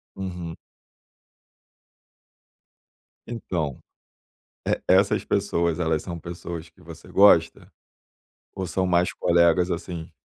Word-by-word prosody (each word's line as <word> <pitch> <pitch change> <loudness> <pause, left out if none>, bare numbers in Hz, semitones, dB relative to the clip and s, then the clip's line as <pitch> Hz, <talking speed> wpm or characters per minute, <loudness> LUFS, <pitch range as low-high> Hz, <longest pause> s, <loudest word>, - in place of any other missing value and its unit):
Uhum. 90 -3 -6 2.7
Então, 85 - -3 0.9
e - - 0
essas 95 +2 +4
pessoas, 85 -5 0
elas 80 -3 0
são 85 -1 -6
pessoas 85 0 -7
que 80 - -24
você - - -12
gosta? 90 -5 +4 0.8
Ou 95 -1 -4
são 95 +2 -1
mais 90 0 +2
colegas, 85 +1 +3
assim? 85 -1 -5
85 Hz, 95 wpm, -24 LUFS, 85-95 Hz, 2.7 s, essas